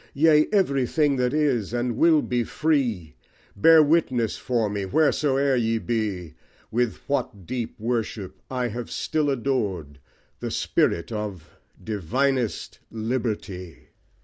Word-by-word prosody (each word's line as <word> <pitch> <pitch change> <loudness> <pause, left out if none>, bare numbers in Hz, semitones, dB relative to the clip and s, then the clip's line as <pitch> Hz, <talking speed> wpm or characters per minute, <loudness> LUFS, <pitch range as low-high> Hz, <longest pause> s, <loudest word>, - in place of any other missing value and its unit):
Yea, 155 +1 +5
everything 145 - +2
that 125 -1 +1
is 135 -8 0
and 120 -1 -1
will 160 +3 +4
be 120 -1 0
free! 120 - -1 0.4
Bear 160 +9 +7
witness 140 -7 +1
for 120 -4 -1
me, 100 -1 -3
wheresoe'er 140 +3 +2
ye 115 -2 +1
be, 105 -8 -3 0.4
With 120 -3 0
what 105 -9 -2
deep 120 +2 -5
worship 110 -4 -3
I 125 -2 -1
have 120 +1 -6
still 155 -2 -1
adored 105 - -2 0.4
The - - -4
spirit 85 +4 0
of 105 -7 -6 0.3
divinest 120 - -1
liberty. 110 -6 -4
120 Hz, 120 wpm, -24 LUFS, 105-140 Hz, 0.4 s, Bear